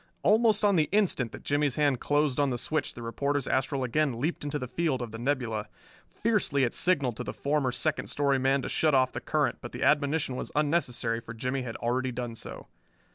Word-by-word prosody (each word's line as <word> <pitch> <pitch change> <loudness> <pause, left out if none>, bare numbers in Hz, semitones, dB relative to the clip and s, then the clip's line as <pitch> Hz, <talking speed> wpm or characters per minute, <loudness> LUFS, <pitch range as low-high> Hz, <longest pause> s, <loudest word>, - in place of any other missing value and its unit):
Almost 215 -1 +4
on 200 -3 +4
the 155 - +2
instant 185 - +1
that - - -10
Jimmie's 145 -2 +1
hand 145 -4 +2
closed 145 -2 +1
on 140 -1 +3
the 125 - -1
switch 155 +6 -2
the 120 - -8
reporter's 140 +4 -1
astral 135 +1 0
again 130 0 0
leaped 155 +5 -2
into 145 0 -2
the 125 - -5
field 155 -1 -1
of 120 -3 -5
the 115 - -7
nebula. 120 -5 -1 0.4
Fiercely 210 -11 +1
it 120 - +1
signalled 140 -10 +1
to 125 - -3
the 105 - -5
former 140 -2 0
second 155 +4 -1
story 140 -2 +1
man 135 +1 +2
to - - -3
shut 155 -3 +2
off 130 -1 +3
the - - -5
current, - - 0
but - - -8
the - - -4
admonition 145 -2 +2
was - - -5
unnecessary, 135 -7 +1
for 115 0 -9
Jimmie 130 +4 -2
had 120 -3 -5
already 125 +2 -1
done 120 -1 -4
so. 115 - -8
135 Hz, 215 wpm, -28 LUFS, 125-150 Hz, 0.4 s, Almost